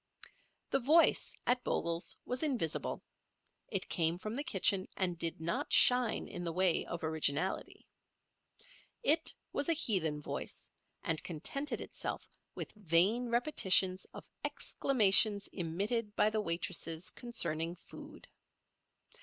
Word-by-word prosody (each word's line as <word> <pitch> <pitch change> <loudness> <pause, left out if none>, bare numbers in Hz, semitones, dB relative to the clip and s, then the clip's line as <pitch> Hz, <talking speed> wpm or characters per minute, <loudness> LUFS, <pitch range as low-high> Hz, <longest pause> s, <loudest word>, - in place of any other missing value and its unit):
The 270 - +2
Voice 310 +7 +3
at 250 0 +1
Bogle's 170 0 -2
was 250 +1 -3
invisible. 250 - -2 0.6
It - - -3
came 165 0 +1
from 215 +5 -6
the 285 - -3
kitchen, 195 - +1
and 180 -2 0
did 165 -1 -3
not 165 +1 -3
shine 250 -2 +5
in 175 - -7
the 170 - -3
way 180 0 +1
of 170 - -6
originality. 160 +2 -2 1.2
It 315 +3 +3 0.2
was 285 - -2
a - - +4
heathen 185 - +1
Voice, 150 - -6 0.3
and 160 -1 -1
contented 230 - -2
itself - - -5 0.3
with - - -6
vain 210 +5 +2
repetitions 195 -7 +3
of - - -13 0.2
exclamations 210 -4 +4
emitted 205 +6 -3
by 215 - +2
the 215 0 -1
waitresses 170 -2 -2
concerning 170 -8 -2
food. - - -13
190 Hz, 120 wpm, -33 LUFS, 165-240 Hz, 1.2 s, shine